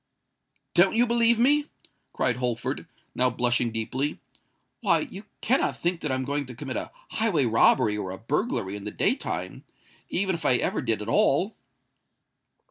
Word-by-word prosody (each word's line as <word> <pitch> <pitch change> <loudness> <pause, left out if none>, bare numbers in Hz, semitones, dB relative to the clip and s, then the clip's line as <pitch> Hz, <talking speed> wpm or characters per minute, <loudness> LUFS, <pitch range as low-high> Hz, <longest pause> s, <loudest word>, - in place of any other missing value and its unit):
"Don't 190 +4 +5
you 240 +2 +4
believe 235 -1 +3
me?" 290 +5 +3 0.4
cried 125 -1 +1
Holford, 125 -2 -2 0.3
now 125 0 +3
blushing 120 0 +1
deeply. 125 +6 -2 0.6
"Why, 170 -3 +2
you 195 +6 -8 0.2
cannot 260 +4 +1
think 175 0 -1
that 150 - -2
I'm 130 0 -1
going 140 0 -2
to 125 - -9
commit 130 +1 -5
a - - -3 0.2
highway 200 - +1
robbery 115 -1 +4
or 100 -3 -4
a 95 - -6
burglary 115 - -2
in 105 - -7
the - - -3
day - - +2
time—even 190 +1 -5
if 170 - -5
I 125 - +4
ever - - 0
did 110 -3 -1
at - - -9
all?" 180 - +2
135 Hz, 160 wpm, -26 LUFS, 115-190 Hz, 0.6 s, Don't